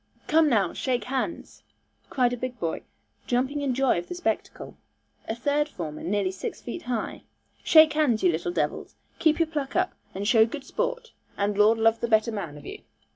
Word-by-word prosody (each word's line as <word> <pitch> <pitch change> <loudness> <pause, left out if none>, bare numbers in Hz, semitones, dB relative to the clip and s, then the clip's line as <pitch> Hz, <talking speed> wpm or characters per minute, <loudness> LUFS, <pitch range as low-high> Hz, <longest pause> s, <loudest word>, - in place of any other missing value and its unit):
'Come 315 -1 +4
now, 200 -8 +2
shake 250 -4 -1
hands,' 265 +7 -4 0.5
cried 245 -2 +2
a - - 0
big 250 0 -5
boy, 165 -3 -2 0.5
jumping 260 +4 0
in 270 -3 0
joy 265 -8 +2
of 175 - -8
the - - -6
spectacle, 355 - -3 0.5
a 225 - -2
third 290 +4 0
former 155 - -6
nearly 195 +1 0
six 190 - -6
feet 240 - -6
high; 240 -3 -3 0.4
'shake 315 -1 +7
hands, 290 -8 +2
you 180 - +5
little 170 +2 -2
devils. - - -2 0.2
Keep 315 -2 +3
your 330 - +2
pluck 295 -4 -4
up, 365 +1 +1 0.2
and 200 +2 -3
show 225 -1 +6
good 265 +5 -4
sport, - - -3 0.3
and 200 0 0
Lord 210 +2 +5
love 225 0 +3
the 235 - -1
better 220 0 +3
man 175 -9 -5
of 145 - -13
you.' - - -8
240 Hz, 190 wpm, -26 LUFS, 205-295 Hz, 0.5 s, shake